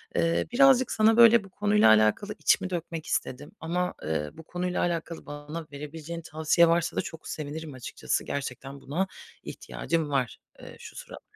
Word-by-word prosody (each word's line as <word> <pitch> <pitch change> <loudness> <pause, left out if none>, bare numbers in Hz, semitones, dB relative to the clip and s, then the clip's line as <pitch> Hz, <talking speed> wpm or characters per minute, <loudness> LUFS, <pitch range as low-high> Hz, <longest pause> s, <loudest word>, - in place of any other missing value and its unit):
Eee, 85 0 +1
birazcık 260 -1 +5
sana, 220 +1 +4
böyle, 235 -1 +7
bu 195 - -14
konuyla 205 - +3
alakalı 110 - +3
içimi 190 -1 +2
dökmek 170 -2 -4
istedim 145 +3 -3
ama, 180 +3 -1
ııı, 75 -1 -2
bu 160 - -10
konuyla 180 +2 -2
alakalı 170 -1 -3
bana 150 +2 -7
verebileceğin 155 +3 -7
tavsiye 160 +2 +3
varsa 170 0 +1
da - - +3
çok 160 - -9
sevinirim 155 0 -6
açıkçası. 125 -2 -3
Gerçekten 135 0 -5
buna 170 +8 -1 0.4
ihtiyacım 165 -3 -3
var, 130 -4 -1 0.2
eee, - - -11
şu - - -11
sıralar. - - -10
160 Hz, 160 wpm, -27 LUFS, 140-180 Hz, 0.4 s, böyle